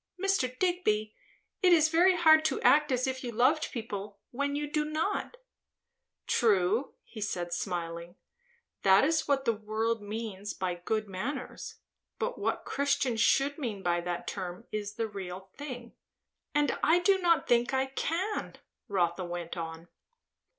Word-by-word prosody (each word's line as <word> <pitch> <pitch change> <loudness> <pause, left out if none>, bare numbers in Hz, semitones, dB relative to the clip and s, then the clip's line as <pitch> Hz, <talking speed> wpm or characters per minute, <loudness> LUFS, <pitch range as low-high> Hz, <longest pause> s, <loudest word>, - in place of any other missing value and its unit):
"Mr. 360 -11 0
Digby, 235 -12 0 0.5
it 365 -2 +5
is 315 -2 +6
very 355 +3 +5
hard 315 -2 +6
to 310 -4 0
act 300 0 +5
as 255 0 +1
if 260 0 -3
you 245 - -3
loved 255 +7 +2
people, 205 -4 -5
when 280 +3 -1
you 295 +1 -1
do 300 +1 0
not." 315 +10 -2 0.9
"True," 215 +2 +2 0.2
said 185 -4 -2
he - - -17
smiling. 170 -1 -4 0.7
"That 195 0 +6
is 315 +1 +1
what 275 -2 +1
the 230 - +3
world 220 +1 -2
means 210 -1 -5
by 185 -1 -2
good 215 +5 -2
manners. 250 +8 -5 0.4
But - - -3
what - - -1
Christians 275 -5 0
should 280 +4 +3
mean 215 -8 -4
by 175 0 +1
that 175 0 -4
term 185 +2 -5
is 205 -1 -4
the 225 - -1
real 190 -2 -7
thing." 250 -5 -7 0.6
"And 295 0 +2
I 325 +3 +5
do 380 +2 +3
not 340 -3 +2
think 240 +1 +3
I 265 0 +1
can," 335 +9 -2 0.3
Rotha 185 -3 0
went 175 -1 -5
on. 165 0 -6
235 Hz, 150 wpm, -30 LUFS, 195-295 Hz, 0.9 s, is